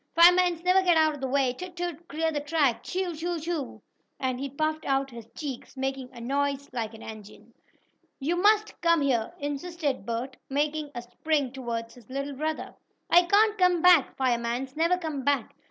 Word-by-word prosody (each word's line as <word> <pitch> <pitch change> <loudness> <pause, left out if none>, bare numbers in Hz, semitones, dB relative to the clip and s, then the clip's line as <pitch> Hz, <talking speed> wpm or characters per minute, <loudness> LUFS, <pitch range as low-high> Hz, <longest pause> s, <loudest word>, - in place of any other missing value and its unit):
"Firemans 350 0 +6
never 365 +1 +5
get 350 -3 +4
out 315 -1 +4
of 290 - -9
the 265 - -1
way! 260 -1 +2
Toot! 360 +6 -8
Toot! 345 -1 -5
Clear 320 +2 -1
the 295 - -1
track! 290 -4 +1
Chuu! 370 -1 -2
Chuu! 340 +2 -3
Chuu!" 320 -4 -4 0.4
and 255 -1 -1
he 275 +1 -3
puffed 310 +3 -1
out 270 0 0
his 235 -2 -10
cheeks, 275 -3 -6
making 265 -1 -3
a 245 - -11
noise 280 +3 -1
like 225 -2 -3
an 220 - -12
engine. 220 +1 -11 0.7
"You 305 +5 0
must 420 +2 +3
come 335 -2 +4
here!" 245 -5 +1
insisted 290 - -3
Bert, 240 +3 -3
making 295 +2 -1
a 240 - -4
spring 275 +2 -1
toward 235 -3 -4
his 240 -2 -17
little 275 +2 -3
brother. 310 +3 -3 0.4
"I 350 +1 +7
can't 420 +3 +4
come 360 -2 +3
back! 355 -6 +6
Firemans 250 +1 -1
never 335 +3 +2
come 310 -6 -4
back!" 280 -4 0
285 Hz, 185 wpm, -27 LUFS, 260-335 Hz, 0.7 s, I